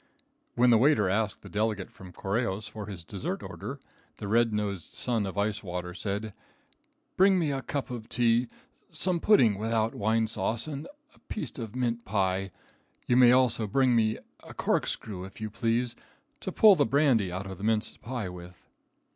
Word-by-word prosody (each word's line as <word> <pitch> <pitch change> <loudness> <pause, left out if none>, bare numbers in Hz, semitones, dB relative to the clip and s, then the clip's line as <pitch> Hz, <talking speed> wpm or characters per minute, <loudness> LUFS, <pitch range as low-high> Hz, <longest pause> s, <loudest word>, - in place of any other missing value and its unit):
When 125 0 +5
the 115 - +6
waiter 125 -7 +4
asked 105 0 -1
the - - -10
delegate 105 -2 -1
from 95 -1 -12
Correjos 100 +2 -2
for 105 -3 -7
his 95 -5 -7
dessert 95 +2 -5
order, - - -7 0.4
the 100 - -6
red 115 +2 +3
nosed 100 -4 -3
Son 115 -5 0
of 95 - -7
Ice 105 +1 0
Water 90 -2 -5
said: 105 +2 -3 0.8
"Bring 190 0 +5
me 160 -5 +1
a 135 -1 -2
cup 140 +1 -4
of 115 -3 -7
tea, 120 0 +2 0.4
some 180 -2 0
pudding 120 - +4
without 110 0 0
wine 110 +2 +1
sauce, 110 +1 -1
and 150 -1 -6 0.3
a - - -23
piece 215 - -4
of 115 -1 -6
mince 120 -2 -1
pie. 95 -1 0 0.6
You 120 - +2
may 125 -1 +7
also 125 -3 +3
bring 130 +3 +3
me 110 -1 +2 0.3
a - - -11
corkscrew, 95 -4 -1
if 95 - -11
you 110 -1 -4
please, 115 +2 0 0.4
to - - -4
pull 215 -2 +7
the - - +3
brandy 125 -8 +3
out 95 +2 -4
of 95 -1 -8
the - - -8
mince 110 0 0
pie 120 -4 -4
with." 90 -1 -11
110 Hz, 180 wpm, -28 LUFS, 100-125 Hz, 0.8 s, may